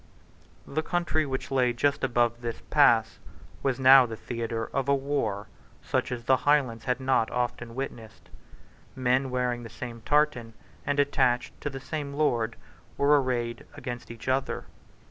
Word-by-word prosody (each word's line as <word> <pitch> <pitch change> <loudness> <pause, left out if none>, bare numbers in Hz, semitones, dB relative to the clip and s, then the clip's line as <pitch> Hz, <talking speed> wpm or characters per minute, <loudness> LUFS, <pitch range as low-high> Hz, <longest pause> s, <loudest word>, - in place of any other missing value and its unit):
The 155 +3 -2
country 160 -2 0
which 130 0 -4
lay 125 -2 +2
just 140 +4 0
above 120 -2 +1
this 115 -1 -5
pass - - +4 0.4
was 135 -1 0
now 130 -1 +8
the 115 - -6
theatre 115 0 -4
of 135 0 0
a 140 - +5
war 135 -8 -2 0.4
such - - -1
as 120 -1 -4
the 130 +2 +4
Highlands 130 -5 +1
had 125 0 0
not 130 -4 +2
often 120 -1 -3
witnessed. 115 -5 -7 0.6
Men 130 +1 +1
wearing 125 -1 -1
the 115 - -9
same 115 0 -8
tartan, 135 -5 +1 0.3
and 145 0 +1
attached 130 -3 +1
to 145 - -2
the 135 -1 -7
same 145 0 -5
lord, 120 -7 +1 0.4
were 145 0 +4
arrayed 120 -2 -3
against 125 -4 -6
each 115 +1 -10
other. 130 +1 -1
125 Hz, 155 wpm, -27 LUFS, 120-140 Hz, 0.6 s, now